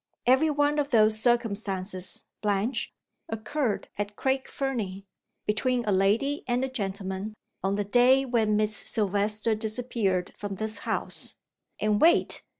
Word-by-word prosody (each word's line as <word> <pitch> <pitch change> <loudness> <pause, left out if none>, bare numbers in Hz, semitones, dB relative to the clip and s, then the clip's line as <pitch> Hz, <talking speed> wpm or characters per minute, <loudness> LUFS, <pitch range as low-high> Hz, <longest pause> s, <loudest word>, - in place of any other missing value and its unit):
Every 265 +6 +4
one 290 0 +2
of 285 -1 0
those 215 -3 +4
circumstances, 200 -6 0 0.2
Blanche, 210 +4 0 0.4
occurred 225 +1 -2
at 205 0 -3
Craig 265 +2 0
Fernie, 210 -8 -3 0.4
between 240 +3 0
a 210 - +1
lady 210 +10 +2
and 250 +1 +1
a - - -5
gentleman, 200 -3 -4 0.3
on 195 +1 0
the 205 0 -1
day 250 +5 +4
when 225 -4 +1
Miss 215 0 +1
Silvester 210 +1 +1
disappeared 215 -4 -1
from 205 -1 -5
this 215 +1 -2
house - - -2 0.4
And 210 -1 +1
wait! 335 +2 +4
215 Hz, 135 wpm, -27 LUFS, 200-250 Hz, 0.4 s, Every